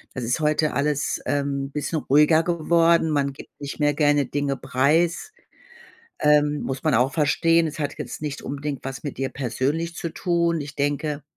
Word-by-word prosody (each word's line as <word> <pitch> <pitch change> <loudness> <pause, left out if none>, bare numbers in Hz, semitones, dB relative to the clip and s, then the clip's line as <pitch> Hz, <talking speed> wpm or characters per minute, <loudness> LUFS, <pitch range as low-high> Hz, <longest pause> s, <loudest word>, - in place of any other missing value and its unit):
Das 130 -3 -3
ist 125 +7 -1
heute 155 0 +1
alles, 145 +2 -1
ähm, 140 0 -1
bisschen 150 +2 -2
ruhiger 150 +3 +4
geworden. 170 -1 +2
Man 140 -2 +1
gibt 135 - -12
nicht 140 +1 -6
mehr 145 0 +2
gerne 145 -1 +2
Dinge 140 +1 -2
preis. 160 - +1 0.9
Ähm, 150 0 +3
muss 135 0 -4
man 155 -2 +2
auch 125 +4 +2
verstehen. 165 +2 +3
Es 155 0 -5
hat 145 -1 -3
jetzt - - -7
nicht 145 -2 -4
unbedingt 140 0 -5
was 135 0 -6
mit 145 - -5
dir 135 0 -2
persönlich 140 +6 -2
zu 170 - -4
tun. 170 0 0
Ich 145 0 -7
denke, 145 +1 -2
145 Hz, 175 wpm, -23 LUFS, 140-160 Hz, 0.9 s, ruhiger